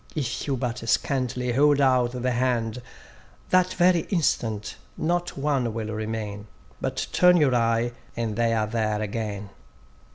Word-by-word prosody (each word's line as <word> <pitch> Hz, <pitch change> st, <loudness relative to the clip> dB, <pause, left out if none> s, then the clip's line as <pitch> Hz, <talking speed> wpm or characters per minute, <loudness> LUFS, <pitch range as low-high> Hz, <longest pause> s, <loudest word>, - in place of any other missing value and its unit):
If 140 Hz, -4 st, -3 dB
you 135 Hz, -2 st, 0 dB
but 125 Hz, -1 st, -3 dB
scantily 125 Hz, -2 st, 0 dB
hold 145 Hz, +2 st, +4 dB
out 130 Hz, -3 st, +3 dB
the 125 Hz, -, +1 dB
hand, 120 Hz, -2 st, 0 dB, 0.7 s
That 185 Hz, 0 st, +4 dB
very 180 Hz, -1 st, +4 dB
instant 115 Hz, -, 0 dB, 0.2 s
not 175 Hz, +1 st, -1 dB
one 135 Hz, -5 st, 0 dB
will 110 Hz, -1 st, -3 dB
remain; 110 Hz, -1 st, -4 dB, 0.3 s
But -, -, -2 dB
turn 180 Hz, 0 st, +5 dB
your 145 Hz, -6 st, +3 dB
eye, 115 Hz, 0 st, +2 dB, 0.2 s
and 115 Hz, -3 st, -2 dB
they 115 Hz, 0 st, +2 dB
are 110 Hz, -1 st, +1 dB
there 110 Hz, -1 st, -1 dB
again. 105 Hz, -2 st, -4 dB
120 Hz, 140 wpm, -25 LUFS, 110-140 Hz, 0.7 s, turn